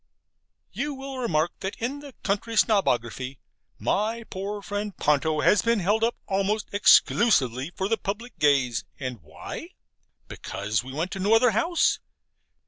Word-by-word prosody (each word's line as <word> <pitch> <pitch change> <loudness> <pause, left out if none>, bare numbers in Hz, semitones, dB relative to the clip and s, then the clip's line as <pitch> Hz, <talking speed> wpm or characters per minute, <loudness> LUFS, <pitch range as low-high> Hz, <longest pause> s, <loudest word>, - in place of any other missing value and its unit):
You 290 0 -3
will 270 0 -7
remark 170 -9 +1
that 190 - -4
in 255 +5 -3
the 285 -2 -11
Country 210 +3 -1
Snobography 130 - +1 0.4
my 225 +3 -1
poor 200 +2 -4
friend 205 0 -4
Ponto 150 +1 +2
has 210 - +4
been 230 -1 +2
held 205 +5 +1
up 235 +1 +2
almost 200 +2 -1
exclusively 145 - +4
for 190 - -1
the 225 +2 +1
public 215 +5 -6
gaze 135 -6 +2 0.2
and 130 -6 -5
why? 75 +1 -9 0.5
Because 105 +3 -3
we 130 - -8
went 160 +7 -3
to 195 - -5
no 205 +4 +4
other 235 +1 +5
house? 325 - +2
200 Hz, 145 wpm, -26 LUFS, 145-225 Hz, 0.5 s, other